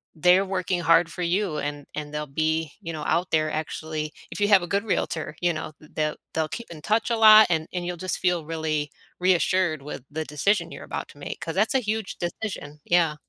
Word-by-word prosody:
they're 180 +4 +5
working 185 -2 -1
hard 165 +1 +4
for 180 - -6
you, 175 -2 0
and 145 -1 -4
and 150 -1 -5
they'll 150 0 -3
be, 160 +2 0
you 165 -3 -5
know, 155 -1 -5
out 175 +1 +1
there 155 -1 +2
actually 155 0 -3 0.2
If - - -6
you 205 - +4
have 200 -3 +7
a - - -4
good 200 +3 0
realtor, 160 -7 -2
you 175 -1 +2
know, 155 - -5
th 155 - -17
they'll 155 -1 0 0.2
they'll 160 -1 0
keep 235 - -7
in 155 -3 -9
touch 215 +8 +1
a 235 - +2
lot, 215 -1 +9
and 160 -2 0
and 175 -1 -2
you'll 175 0 -3
just 185 +2 -3
feel 175 -4 +1
really 155 -2 -2 0.3
reassured 180 -3 +2
with 140 -3 -7
the 155 +1 -3
decision 200 +8 +1
you're - - -8
about - - -5
to - - -16
make, - - -6
'cause - - -4
that's - - +2
a - - +5
huge 220 -2 -3
decision, 170 -5 -5
yeah. 170 -3 +3
165 Hz, 225 wpm, -25 LUFS, 155-185 Hz, 0.3 s, lot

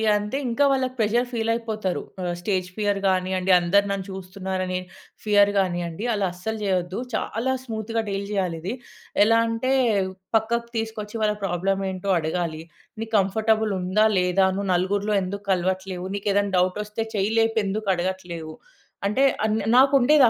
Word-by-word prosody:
అంతే 210 +6 -1
ఇంకా 240 +5 +1
వాళ్ళకి 260 -1 0
ప్రెజర్ 235 +3 +2
ఫీలైపోతారు. 225 -4 -1 0.2
ఆహ్, 175 -1 -1
స్టేజ్ 185 -1 -1
ఫియర్ 205 -1 +1
గానియ్యండి, 185 0 +1
అందరు 200 +4 +3
నన్ను 195 -1 -2
చూస్తున్నారనే 185 -1 -3 0.5
ఫియర్ 205 -1 +5
గానియ్యండి. 175 -1 -1
అలా 205 -2 0
అస్సలు 220 +5 -4
జేయొద్దు. 185 -1 -1
చాలా 230 +4 -1
స్మూత్‌గా 225 -1 -3
డీల్ 195 0 -2
జేయాలిది. 185 0 -2 0.5
ఎలా 225 +1 +4
అంటే 230 +3 -1 0.7
పక్కకు 235 +2 -1
తీసుకొచ్చి, 220 -1 -4
వాళ్ళ 210 -1 +2
ప్రాబ్లమేంటో 190 +1 -1
అడగాలి. 160 0 -2 0.4
నీకు 225 0 -6
కంఫర్టబుల్ 220 +2 +2
ఉందా, 190 +4 +2
లేదా 180 +1 +3
నువు 200 - -2
నలుగురిలో 200 +4 0
ఎందుక్కలవట్లేవు, 185 -1 -2
నీకేదైనా 200 0 0
డౌటొస్తే 210 +4 -1
చెయ్యిలేపి 225 +3 +1
ఎందుకు 200 +1 -2
అడగట్లేవు, 175 -3 -4 0.5
అంటే 235 +7 +2 0.2
అన్ 215 0 +1 0.2
నాకుండేది 275 +1 +6
200 Hz, 125 wpm, -24 LUFS, 185-220 Hz, 0.7 s, నాకుండేది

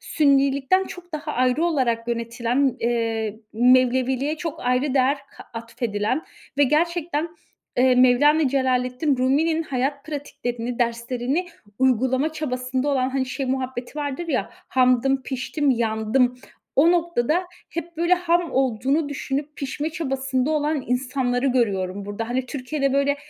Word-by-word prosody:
Sünnilikten 280 +4 +2
çok 350 -2 -11
daha 305 0 -4
ayrı 255 +5 +2
olarak 240 -8 0
yönetilen, 235 +3 0
eee, 225 -2 -1 0.2
Mevleviliğe 255 +4 +3
çok 330 -1 -5
ayrı 255 +3 +1
değer 270 +2 +3 0.2
ka - - -11
atfedilen 230 +3 -2 0.4
ve 285 - +6
gerçekten, 330 +2 0 0.5
eee, 255 0 +4
Mevlana 265 +4 +5
Celaleddin 260 +1 +1
Rumi'nin 310 +6 +2
hayat 275 0 -2
pratiklerini, 245 -5 -4
derslerini 245 +7 -1 0.3
uygulama 260 +4 +2
çabasında 255 -3 -2
olan, 260 -2 +1
hani, 265 -1 -1
şey 260 +1 -3
muhabbeti 260 +1 -3
vardır 290 +4 -3
ya 270 -5 -1
"Hamdım, 265 -6 +1
piştim, 275 +2 -1
yandım." 235 +2 +1 0.4
O 325 +5 +6
noktada 340 -1 +1 0.3
hep 335 0 -6
böyle 345 +2 +3
ham 350 -1 0
olduğunu 265 +4 +1
düşünüp 285 +1 -4
pişme 285 +3 -3
çabasında 270 -3 -1
olan 300 -2 0
insanları 250 0 0
görüyorum 200 -6 0
burada. 205 +3 -5
Hani, 255 +1 -1
Türkiye'de, 275 +1 -2
böyle, 280 +1 +2
265 Hz, 125 wpm, -23 LUFS, 245-295 Hz, 0.5 s, ve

